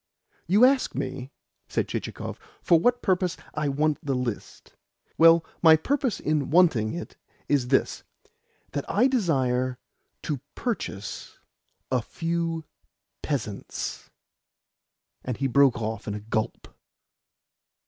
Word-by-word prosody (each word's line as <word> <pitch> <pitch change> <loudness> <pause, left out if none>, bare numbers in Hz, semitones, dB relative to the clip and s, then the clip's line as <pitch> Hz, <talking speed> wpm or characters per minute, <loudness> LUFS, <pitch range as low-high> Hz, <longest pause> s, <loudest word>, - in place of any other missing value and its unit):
"You 205 +8 +6
ask 265 0 +2
me," 130 0 -4 0.4
said - - -1
Chichikov, - - -5 0.2
"for 170 - +5
what 245 +7 +2
purpose 185 -2 +1 0.2
I 150 -1 -1
want 150 +2 0
the 140 -2 -1
list. 125 -4 -5 0.4
Well, 165 0 +6 0.2
my 160 -2 +8
purpose 255 - -1
in 150 -3 0
wanting 145 -10 +3
it 175 - -7 0.3
is 140 -4 +1
this 130 +1 +1 0.7
that 145 -1 -2
I 225 +5 +3
desire 130 - +1 0.5
to 145 -6 -3
purchase 200 - -4 0.5
a 130 -2 +2
few 165 +4 -3 0.6
peasants." 110 -9 -4 1.1
And 125 -3 -3
he 135 - -1
broke 135 -1 +4
off 110 -1 -4
in 105 - -2
a - - -4
gulp. 110 +1 -4
145 Hz, 115 wpm, -26 LUFS, 125-170 Hz, 1.1 s, my